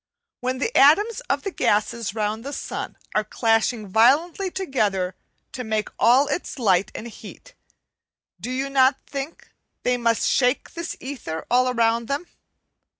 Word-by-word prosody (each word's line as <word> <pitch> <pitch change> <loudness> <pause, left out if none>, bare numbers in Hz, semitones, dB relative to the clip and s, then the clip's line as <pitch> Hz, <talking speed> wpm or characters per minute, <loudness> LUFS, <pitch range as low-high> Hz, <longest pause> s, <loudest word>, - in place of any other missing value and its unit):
When 255 +1 -2
the 450 - -2
atoms 410 - +5
of - - 0
the 395 - -3
gases 210 - 0
round 215 +1 -2
the 280 +2 -6
sun - - -5 0.2
are 215 - +2
clashing 225 +1 +1
violently 285 - +3
together 210 - -1 0.4
to 250 - -5
make 220 -2 -1
all 255 +5 +5
its 295 +2 -3
light 195 -6 +2
and 230 - -6
heat, - - -12 0.9
do - - -6
you 260 +2 -2
not 270 0 +3
think 280 +3 -7 0.3
they 250 0 +2
must 230 -1 +1
shake 250 +1 +1
this 335 0 -5
ether 245 - -6
all 255 +1 +4
around 230 -1 +1
them? 280 +6 -2
250 Hz, 150 wpm, -23 LUFS, 220-280 Hz, 0.9 s, atoms